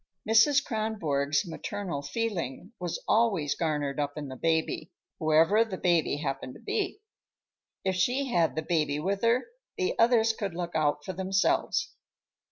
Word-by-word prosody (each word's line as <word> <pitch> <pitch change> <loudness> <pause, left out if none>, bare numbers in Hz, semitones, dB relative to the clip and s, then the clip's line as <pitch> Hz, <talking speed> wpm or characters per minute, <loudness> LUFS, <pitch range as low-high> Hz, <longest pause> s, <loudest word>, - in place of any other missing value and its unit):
Mrs. 225 +6 +5
Kronborg's 200 - -1
maternal 175 -2 -4
feeling 180 - -3
was 175 -2 -4
always 200 -11 +2
garnered 150 -4 -1
up 145 -1 -1
in 145 -2 -5
the 130 - -7
baby, 160 +2 0 0.3
whoever 160 +7 +4
the 210 -5 -6
baby 170 -5 +2
happened 135 -3 -4
to - - -12
be. 415 -1 -2 0.8
If 190 -1 +1
she 250 +9 +1
had 170 -7 +2
the 160 - -2
baby 155 -3 0
with 195 +6 -1
her, 235 +2 +3 0.3
the 385 +4 0
others 230 -1 +4
could 200 -5 -4
look 175 0 -4
out 150 -2 0
for 190 - -4
themselves. 190 +1 +1
175 Hz, 150 wpm, -28 LUFS, 150-220 Hz, 0.8 s, Mrs